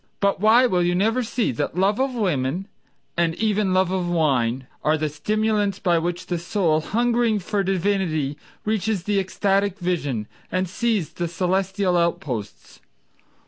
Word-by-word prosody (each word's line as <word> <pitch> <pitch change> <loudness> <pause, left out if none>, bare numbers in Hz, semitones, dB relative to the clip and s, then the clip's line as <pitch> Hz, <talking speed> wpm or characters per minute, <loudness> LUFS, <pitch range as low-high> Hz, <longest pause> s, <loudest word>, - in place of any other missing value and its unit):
But 200 -1 +1
why 225 +5 +6
will 185 -7 +2
you 175 0 +1
never 225 +7 +2
see 235 - -1
that 125 +7 -3
love 200 +5 +2
of 265 -1 0
women, 180 - -1 0.5
And 170 -1 +1
even 210 -2 +1
love 185 0 +2
of 185 -2 -1
wine, 130 -7 +1 0.2
Are 155 +1 +3
the 155 0 -1
stimulants 210 +4 0
by 175 -4 +2
which 175 +1 -3
the 175 -2 -2
soul, 170 -3 +1
hungering 235 +3 +1
for 205 +1 -1
divinity, 185 -6 0 0.3
Reaches 215 -3 0
the 205 0 +1
ecstatic 195 +1 0
vision 145 - -2 0.2
And 185 0 0
sees 205 -4 -1
the 175 - -2
celestial 185 +2 0
outposts? 135 -11 -3
185 Hz, 150 wpm, -23 LUFS, 170-210 Hz, 0.5 s, why